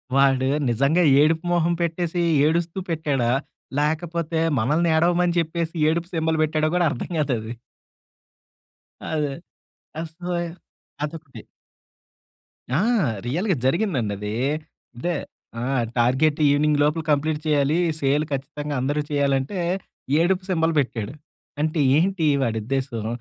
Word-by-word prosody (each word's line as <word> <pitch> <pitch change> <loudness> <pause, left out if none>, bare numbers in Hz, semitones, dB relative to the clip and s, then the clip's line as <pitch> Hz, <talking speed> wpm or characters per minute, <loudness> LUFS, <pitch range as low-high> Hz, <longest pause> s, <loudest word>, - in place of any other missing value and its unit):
వాడు, 135 -1 +4 0.2
నిజంగా 140 +9 +2 0.2
ఏడుపు 160 +2 +2
మొహం 170 0 +2
పెట్టేసీ, 170 +1 -1 0.2
ఏడుస్తూ 170 +3 0
పెట్టాడా? 145 -7 0 0.5
లేకపోతే 160 +2 -1 0.2
మనల్నేడవమని 170 +6 +2
చెప్పేసి, 165 0 -2 0.2
ఏడుపు 170 +2 -1
సింబాల్ 160 -1 0
బెట్టాడో 155 0 +1
గూడా 180 -1 +3
అర్థం 120 - -5
గాదది. 120 -7 -1 1.5
అదే. 150 -3 -1 0.7
అస్సలా 175 +2 -4 0.7
అదొకటి. 150 -2 -7 1.3
ఆ! - - +3 0.5
రియల్‌గా 175 - 0
జరిగిందండదీ. 120 - 0 0.6
అదే, 175 +8 -1 0.5
ఆ! - - -2 0.4
టార్గెట్ 130 +6 +2
ఈవినింగ్ 145 +1 +3
లోపుల 150 +2 +1
కంప్లీట్ 150 +1 +1
చేయాలీ, 150 0 +2 0.2
సేల్ 145 +2 +1
ఖచ్చితంగా 145 +2 -4
అందరూ 145 +3 0
చేయాలంటే, 140 +3 0 0.6
ఏడుపు 185 +3 +2
సింబాల్ 165 -2 +1
బెట్టాడు. 120 -3 -2 0.5
అంటే 155 +1 0 0.2
ఏంటి 180 0 +1 0.2
వాడుద్దేశం? 115 0 -2
155 Hz, 100 wpm, -23 LUFS, 135-170 Hz, 1.5 s, వాడు